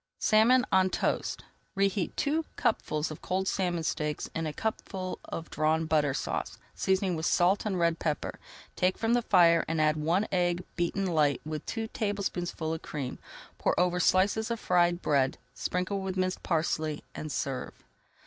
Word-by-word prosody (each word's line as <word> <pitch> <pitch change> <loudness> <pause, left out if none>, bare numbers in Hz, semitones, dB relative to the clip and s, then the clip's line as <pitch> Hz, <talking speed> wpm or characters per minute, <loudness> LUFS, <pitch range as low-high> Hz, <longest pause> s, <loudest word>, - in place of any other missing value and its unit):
SALMON 240 +4 +4
ON 190 0 +4
TOAST - - -1 0.3
Reheat 195 -2 0
two 310 +3 +1
cupfuls 155 +1 0
of 155 - -8
cold 190 +1 -1
salmon 175 -4 0
steaks 150 -1 -2
in 165 -1 -2
a - - -2
cupful 190 0 -4
of 165 - -6
Drawn 155 +2 +1
Butter 150 -4 +2
Sauce, - - -3 0.2
seasoning 190 -1 +1
with 160 +1 -1
salt 190 +5 +3
and 195 -3 -1
red 170 -1 +1
pepper. 150 -3 -2 0.4
Take 185 +1 +1
from 225 +1 +1
the 245 - +3
fire 170 -6 +5
and 165 0 -1
add 155 0 +3
one 170 +7 +1
egg 175 -1 +1
beaten 180 +3 0
light 150 -6 +2
with 155 -1 -5
three 225 -1 -3
tablespoonfuls 190 -7 -2
of - - -17
cream. 140 -4 -5 0.4
Pour - - +1
over 180 0 +2
slices 200 +5 +3
of 230 -1 -2
fried 175 -2 +2
bread, 135 -3 +2 0.2
sprinkle 185 +2 -2
with 190 -1 -3
minced 185 0 0
parsley, 155 -2 -1
and 155 - -6
serve. 135 -3 -3
175 Hz, 165 wpm, -29 LUFS, 155-190 Hz, 0.4 s, fire